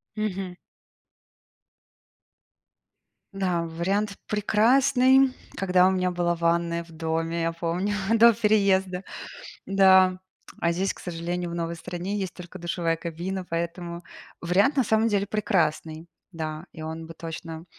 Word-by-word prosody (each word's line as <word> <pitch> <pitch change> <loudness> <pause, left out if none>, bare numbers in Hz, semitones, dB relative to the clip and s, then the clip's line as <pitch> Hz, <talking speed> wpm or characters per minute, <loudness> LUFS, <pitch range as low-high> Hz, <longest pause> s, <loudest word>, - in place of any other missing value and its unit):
Мгм. 195 -4 -3 2.8
Да, 185 -3 0
вариант 195 +5 -1
прекрасный, 255 +5 +4 0.2
когда 185 -1 +4
у - - +3
меня 185 -1 0
была 175 -1 0
ванная 170 0 0
в 165 - -17
доме, 165 +1 -2
я 165 0 0
помню, 175 +5 -2 0.2
до 230 +1 +7
переезда. 195 -4 +2 0.6
Да, 190 -1 +5 0.4
а 170 - +2
здесь, 190 +3 0
к - - -15
сожалению, 175 0 -4
в - - -5
новой 170 0 -3
стране 180 +4 -4
есть 190 -2 -4
только 180 +1 -10
душевая 170 -1 -1
кабина, 175 +3 -5
поэтому 170 +1 -4 0.4
вариант 195 - +2
на 265 - +3
самом 220 +1 +2
деле 200 -2 +1
прекрасный, 165 -6 -1 0.3
да, 155 0 -5
и 160 - -9
он 160 +1 -6
бы 165 - -10
точно 165 0 -7
180 Hz, 130 wpm, -26 LUFS, 170-195 Hz, 2.8 s, до